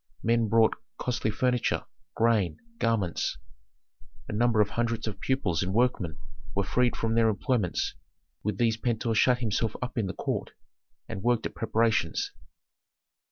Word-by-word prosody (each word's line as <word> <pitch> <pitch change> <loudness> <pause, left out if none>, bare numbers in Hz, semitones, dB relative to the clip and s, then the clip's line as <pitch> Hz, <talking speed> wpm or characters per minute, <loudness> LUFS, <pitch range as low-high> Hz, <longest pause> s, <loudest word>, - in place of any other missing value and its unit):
Men 115 0 +3
brought 115 0 +5 0.2
costly 120 -3 -1
furniture, 125 +2 +1 0.3
grain, 110 -5 +2 0.2
garments. 105 -7 0 0.9
A - - -5
number 115 +1 +3
of 105 - +3
hundreds 115 -1 -1
of 105 -3 -5
pupils 105 - 0
and 95 +2 -1
workmen 110 -10 +1 0.4
were 100 - +2
freed 125 +5 +2
from 115 0 -1
their 115 -1 +4
employments; 110 - 0 0.5
with 105 -2 -2
these 115 -1 +2
Pentuer 115 -1 0
shut 125 +3 +4
himself 110 -1 0
up 125 -1 -3
in 105 - 0
the 95 - -5
court - - -3 0.5
and 95 - -5
worked 120 +1 +2
at - - -3
preparations. 110 -6 +1
115 Hz, 145 wpm, -28 LUFS, 105-120 Hz, 0.9 s, brought